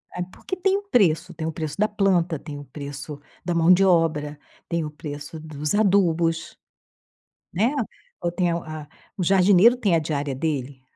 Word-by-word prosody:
É, 180 - -3
porque 185 - -7
tem 385 +2 +2
um 405 0 -9
preço. 180 - +2
Tem 160 -1 -4
o - - -1
preço 155 -1 -5
da 210 - +3
planta. 185 -5 +1
Tem 150 -1 -8
o 145 - -10
preço 140 +1 -7 0.3
da 175 - 0
mão 170 +2 +6
de 195 - +4
obra. 150 -4 +1 0.3
Tem 170 -1 -1
o 150 - -5
preço 150 +1 -7
dos 150 0 -4
adubos, 175 -5 +2 1.0
né. 225 +9 +2 0.5
Ou 170 - -1
tem 175 0 +1
o 170 - 0
a 155 -1 -7
a 145 - -14 0.3
o 190 - -2
jardineiro 195 +5 +5
tem 205 -8 +1
a - - +4
diária 145 -3 -2
dele. 135 -2 -3
165 Hz, 185 wpm, -24 LUFS, 150-185 Hz, 1.0 s, mão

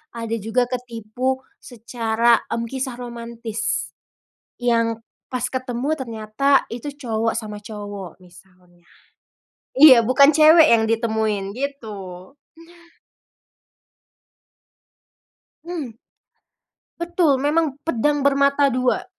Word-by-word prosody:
ada 230 -1 -3
juga 225 +4 0
ketipu 250 +2 -3 0.2
secara, 230 -1 0
hmm, 230 - -2
kisah 260 -1 -4
romantis, 235 -2 -5 0.7
yang 230 -2 +1 0.3
pas 255 - -1
ketemu 255 +3 -3
ternyata 235 +2 0
itu 245 +5 -6
cowok 225 -5 -2
sama 210 -2 -7
cowok 205 -4 -8
misalnya. 180 -1 -21 0.9
Iya, 260 -5 +8
bukan 275 +3 +6
cewek 315 +1 +7
yang 225 -1 +4
ditemuin, 220 -3 -1
gitu. 210 -8 -7 0.5
Nah. 340 0 -24 2.7
Hmm. 320 -9 -6 1.1
Betul, 340 -6 +1
memang 300 0 +1
pedang 290 0 0
bermata 280 0 +3
dua. 250 0 0
240 Hz, 90 wpm, -21 LUFS, 220-275 Hz, 2.7 s, Iya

